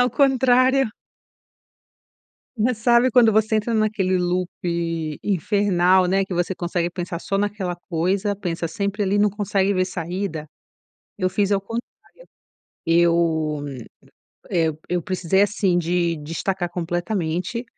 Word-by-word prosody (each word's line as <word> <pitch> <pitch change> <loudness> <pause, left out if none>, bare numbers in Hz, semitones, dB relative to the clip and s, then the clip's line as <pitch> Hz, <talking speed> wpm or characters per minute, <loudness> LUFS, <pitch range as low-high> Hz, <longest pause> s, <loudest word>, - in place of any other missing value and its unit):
Ao 250 0 +3
contrário 260 -2 +3 1.7
Mas 230 +1 0
sabe, 240 +2 +4
quando 230 -2 +5
você 220 +1 +2
entra 215 +2 -1
naquele 215 -4 +1
loop 180 0 0 0.7
infernal, 190 -1 +2
né, 195 +2 +2
que 190 - -5
você 175 +2 -1
consegue 175 -1 -2
pensar 175 -1 -5
só 195 +1 -2
naquela 200 -3 -2
coisa, 185 +4 0
pensa 170 -3 -3
sempre 200 +5 -2
ali, 200 +1 +1
não 205 0 +3
consegue 200 -1 0
ver 185 -1 +1
saída? 175 -2 -4 0.7
Eu 185 -2 0
fiz 205 0 +1
ao 195 - +2
contrário. 230 +4 -4 1.0
Eu, 165 -3 +2 0.9
eh, 165 -2 +1 0.2
eu 175 -1 -1
precisei 185 +2 +1
assim, 200 -3 +1
de 170 0 0
destacar 175 +4 -3
completamente, 175 +5 -2
190 Hz, 125 wpm, -22 LUFS, 175-210 Hz, 1.7 s, quando